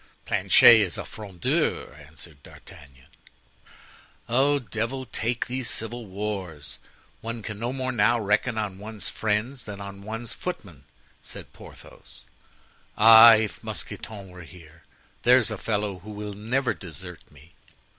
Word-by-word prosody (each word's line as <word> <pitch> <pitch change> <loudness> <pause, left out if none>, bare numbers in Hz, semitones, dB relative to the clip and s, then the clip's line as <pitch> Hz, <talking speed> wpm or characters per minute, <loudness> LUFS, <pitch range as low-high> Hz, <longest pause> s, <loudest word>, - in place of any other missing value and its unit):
"Planchet 115 - +7
is 95 -5 0
a - - -5
Frondeur," 95 -9 -2
answered 75 0 -12
D'Artagnan. 65 -1 -15 1.7
"Devil 115 +4 -3
take 120 0 -2
these 125 0 -4
civil 115 +1 -3
wars! 95 -6 -5 0.4
one 115 -1 -5
can 105 +1 -6
no 120 +2 -2
more 130 -1 -3
now 120 0 +2
reckon 110 +3 0
on 100 -3 -3
one's 105 0 -6
friends 110 +5 -2
than 100 -1 -8
on 100 0 -8
one's 110 +3 -6
footmen," 85 - -7 0.4
said - - -10
Porthos. - - -14 0.7
"Ah! 115 +1 +10
if 110 -1 -3
Mousqueton 100 -3 -6
were 90 0 -12
here! 80 -2 -15 0.4
there's 120 -2 +4
a 110 - -4
fellow 105 -3 -2
who 100 +5 -13
will 105 0 -6
never 120 +6 -1
desert 90 -1 -10
me!" 75 +3 -19
105 Hz, 130 wpm, -25 LUFS, 95-115 Hz, 1.7 s, Ah